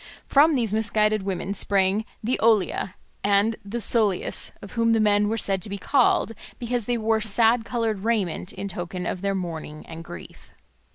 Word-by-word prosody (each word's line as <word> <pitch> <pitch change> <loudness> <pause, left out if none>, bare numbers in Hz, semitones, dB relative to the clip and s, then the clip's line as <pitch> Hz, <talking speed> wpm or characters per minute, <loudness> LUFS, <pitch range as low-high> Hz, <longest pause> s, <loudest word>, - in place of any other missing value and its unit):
From 295 +2 +4
these 230 -5 -1
misguided 215 -1 +1
women 190 0 -3
sprang 200 +1 +1 0.2
the 245 +4 0
Oleae 205 -3 +1 0.3
and 205 +2 +3
the 200 +4 -5
Psoloeis, 215 -4 +1
of 200 - -11
whom 230 -1 +2
the 225 - +3
men 210 -1 +3
were 225 - -1
said 195 -3 0
to 205 - -4
be 200 - -4
so 190 - -15
called 260 -4 +3 0.3
because 240 -2 -2
they 245 +1 0
wore 220 0 +1
sad 225 +2 +3
coloured 225 -2 -1
raiment 205 -6 -1
in 195 +1 -6
token 180 0 -5
of 180 - -3
their 200 0 -1
mourning 160 -4 -6
and 165 0 -9
grief. 85 - -12
210 Hz, 180 wpm, -24 LUFS, 190-225 Hz, 0.3 s, From